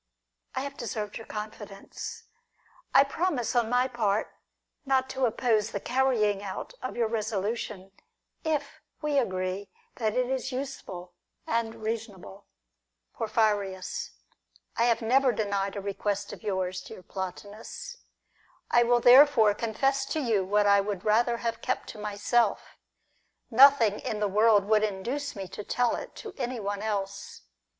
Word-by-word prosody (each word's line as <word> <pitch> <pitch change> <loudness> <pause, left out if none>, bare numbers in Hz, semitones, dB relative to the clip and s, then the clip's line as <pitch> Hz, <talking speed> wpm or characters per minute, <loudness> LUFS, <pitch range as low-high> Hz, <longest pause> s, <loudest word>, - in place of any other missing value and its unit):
I - - 0
have 275 0 -6
deserved 210 -2 -4
your 225 - -11
confidence. 210 -2 -7 0.7
I - - +7
promise, 280 -4 -1
on 235 -2 +2
my 250 +1 +3
part, 220 -5 -1 0.5
not 265 -2 +2
to 265 -1 +1
oppose 220 -2 +1
the 200 - -3
carrying 235 -5 +1
out 200 - -6
of 255 - -5
your 235 -2 +2
resolution, 215 -2 -3 0.5
if 300 -3 -2 0.2
we 295 -2 +2
agree 185 -3 -2 0.3
that 220 -2 0
it 250 0 +1
is 265 0 -2
useful 250 -10 -6 0.3
and 225 -1 -2
reasonable. 215 -3 -5 0.7
Porphyrius. 205 -4 -1 0.6
I 235 - +2
have 230 -1 +2
never 260 +3 +4
denied 200 -3 -1
a 200 - -3
request 200 0 -2
of - - -10
yours, 185 -3 -2
dear 185 - -11
Plotinus. 205 - -7 0.7
I 240 - +6
will 240 0 +3
therefore 245 -4 +7
confess 270 +6 0
to 315 - -1
you 225 -8 +1
what 205 +2 +2
I 200 0 +5
would 195 -2 -4
rather 235 +3 +3
have 230 -1 -3
kept - - -2
to 215 - -8
myself; 210 +3 0 0.8
nothing 235 -4 +6
in 215 - -3
the 210 - +1
world 210 0 +4
would 215 0 +3
induce 235 +8 -2
me 195 -2 -5
to 210 - -7
tell 245 +3 +1
it - - -8
to 430 -4 -8
anyone 220 -6 -3
else. 200 -2 -4
220 Hz, 140 wpm, -28 LUFS, 200-245 Hz, 0.8 s, I